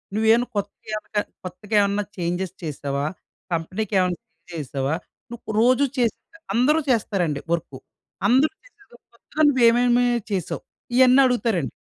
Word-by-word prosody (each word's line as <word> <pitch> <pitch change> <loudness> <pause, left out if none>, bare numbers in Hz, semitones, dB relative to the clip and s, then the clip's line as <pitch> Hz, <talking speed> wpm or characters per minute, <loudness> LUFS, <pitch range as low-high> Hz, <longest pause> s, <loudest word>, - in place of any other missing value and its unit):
నువ్వేమన్నా 225 +3 +3
కొత్తగేవన్న 215 +1 -4 0.3
కొత్తగా 205 +4 -5
ఏమన్నా 200 +1 +1
చేంజెస్ 175 +1 -2
చేసావా? 140 -2 -3 0.5
కంపెనీ‌కి 185 +6 -3
ఏమన్నా 180 -2 0
చేంజ్ 165 +3 -30
చేసావా? 140 0 -2 0.4
నువ్వు 225 -2 -7
రోజు 255 +4 +4
చేసే 235 -3 +1 0.4
అందరూ 280 +7 +3
చేస్తారండి 180 - 0
వర్కు. 165 -5 -3 0.5
అందరూ 265 - +4
చేసే 465 -5 -22 0.3
కొత్తగా 310 - -3
నువ్వేమేమి 245 -1 +4 0.3
చేసావ్?" 185 -5 -3 0.3
ఇయన్నీ 260 +1 +7
అడుగుతారండి. 225 - 0
210 Hz, 115 wpm, -23 LUFS, 170-245 Hz, 0.5 s, ఇయన్నీ